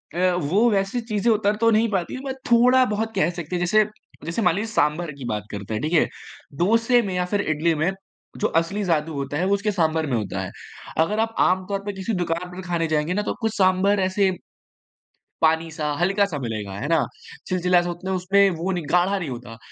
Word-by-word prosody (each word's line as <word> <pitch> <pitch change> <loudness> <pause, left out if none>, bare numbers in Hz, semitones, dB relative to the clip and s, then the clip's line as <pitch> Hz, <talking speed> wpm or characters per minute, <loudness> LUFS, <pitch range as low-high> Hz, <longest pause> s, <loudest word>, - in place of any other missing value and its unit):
अ, - - -4 0.2
वो 185 +9 +2
वैसी 195 +4 0
चीज़ें 225 0 0
उतर 210 -1 +2
तो 230 - +5
नहीं 220 +2 +3
पाती, 190 +4 -2
बट 265 -1 -3 0.2
थोड़ा-बहुत 235 -2 +4
कह 190 - +2
सकते 170 +2 -4
हैं। - - 0
जैसे 215 +4 +4 0.4
जैसे 165 +7 -2
मान 180 -4 +3
लीजिए 215 +3 -2
सांभर 155 0 +1
की 130 - -7
बात 105 -1 -2
करते 105 +1 -6
हैं, 110 - -2
ठीक 155 - -1
है? 165 - +5 0.5
डोसे 230 - +3
में 190 -2 -3
या 180 - 0
फिर 205 - +2
इडली 160 -1 +1
में 160 +5 +1 0.5
जो - - +2
असली 195 +5 -3
जादू 160 -3 0
होता 140 +1 -3
है 180 - 0
वो 195 - +2
उसके 200 +1 0
सांभर 160 -4 +1
में 130 - 0
होता 105 -3 -3
है। - - -5 0.5
अगर 210 +7 +2
आप 225 0 0
आमतौर 185 +2 +1
पे 205 - -3
किसी 195 +3 -3
दुकान 175 0 -2
पे - - -10
भी 190 - -6
खाने 170 -2 -1
जाएँगे 155 +2 0
ना 210 - 0
तो - - -2
कुछ 225 -1 -1
सांभर 195 +1 +3
ऐसे 190 +1 +2 1.1
पानी-सा, 160 -1 +1
हल्का-सा 195 -2 +1
मिलेगा, 110 -6 -4
है 140 - -3
ना? 165 -2 +2 0.4
चिलचिला-सा 180 -1 +2
उतना 185 +2 -4
उसमें 195 +2 +3
वो 185 +3 -1
नहीं 175 -3 -2
गाढ़ा 180 +3 +3
नहीं 165 -6 -4
होता। 120 -2 -8
180 Hz, 210 wpm, -23 LUFS, 160-205 Hz, 1.1 s, तो